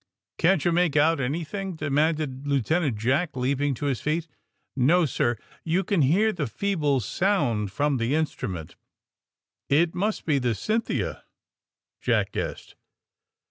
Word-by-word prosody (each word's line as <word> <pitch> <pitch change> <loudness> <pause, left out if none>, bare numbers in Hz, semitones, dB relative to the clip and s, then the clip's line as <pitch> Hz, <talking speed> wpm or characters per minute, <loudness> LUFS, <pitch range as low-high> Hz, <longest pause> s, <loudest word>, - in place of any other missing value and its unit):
^^ - - -66
Can't 175 -2 +3
you 175 - +3
make 170 -3 +2
out 155 +1 +4
anything?" 165 +8 -3
demanded 150 -2 0
Lieutenant 140 -1 +1
Jack, 130 +10 0
leaping 135 +2 0
to 145 - -5
his 135 -4 -1
feet. 160 +2 -1 0.5
*^No, 155 +6 +4
sir; 120 -2 0 0.3
you 170 +4 +1
can 190 -2 +1
hear 195 +11 +3
the 150 -6 -2
feeble 150 - 0
sound 120 - 0
from 145 +2 +1
the 120 +4 0
instrument." 95 - -3 1.0
^*It 160 +4 +3
must 205 +4 -1
be 145 -4 +2
the 120 -3 0
'Cynthia,' 220 - -2 0.4
" - - -63
Jack - - +1
guessed. - - -5
150 Hz, 140 wpm, -26 LUFS, 130-175 Hz, 1.0 s, out